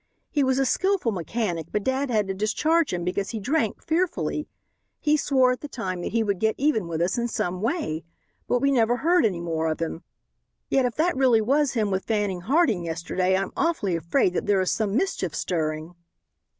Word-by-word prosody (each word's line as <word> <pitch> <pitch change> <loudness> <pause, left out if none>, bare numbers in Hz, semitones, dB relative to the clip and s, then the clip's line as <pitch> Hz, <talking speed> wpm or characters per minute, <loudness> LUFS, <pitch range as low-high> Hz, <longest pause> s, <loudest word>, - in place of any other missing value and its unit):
He 290 - +2
was 260 0 +2
a 270 - +2
skillful 375 -2 +1
mechanic, 175 -3 -3
but 210 - -1
dad 265 +3 0
had 215 -4 +1
to 195 - -2
discharge 300 - +1
him 175 -1 -2
because 185 +2 -2
he 225 - -4
drank 240 0 -1
fearfully. 315 - -1 0.5
He 300 0 +2
swore 265 -3 +3
at 250 - -3
the 295 - -5
time 185 -9 -4
that - - -4
he 230 0 +1
would 200 -3 -1
get 220 +1 +1
even 265 - +1
with 165 -1 -3
us 185 +7 0
in 235 - 0
some 180 -5 -2
way. 215 - -1 0.4
But 245 - +1
we 275 - +3
never 240 -2 +3
heard 335 -2 +3
any 180 -5 -4
more 160 -1 -1
of 155 - -2
him. 165 0 -3 0.7
Yet 270 -2 +3
if 245 - -2
that 335 +2 +1
really 255 -4 +4
was 275 +5 +2
him 215 -4 0
with 190 0 -1
Fanning 205 -5 -1
Harding 235 - +2
yesterday 180 +3 0
I'm 195 0 -2
awfully 265 - 0
afraid 180 - +1
that - - -2
there 200 -2 +3
is 185 - 0
some 210 -2 -1
mischief 385 +6 -1
stirring." 155 -1 -2
220 Hz, 205 wpm, -25 LUFS, 180-270 Hz, 0.7 s, really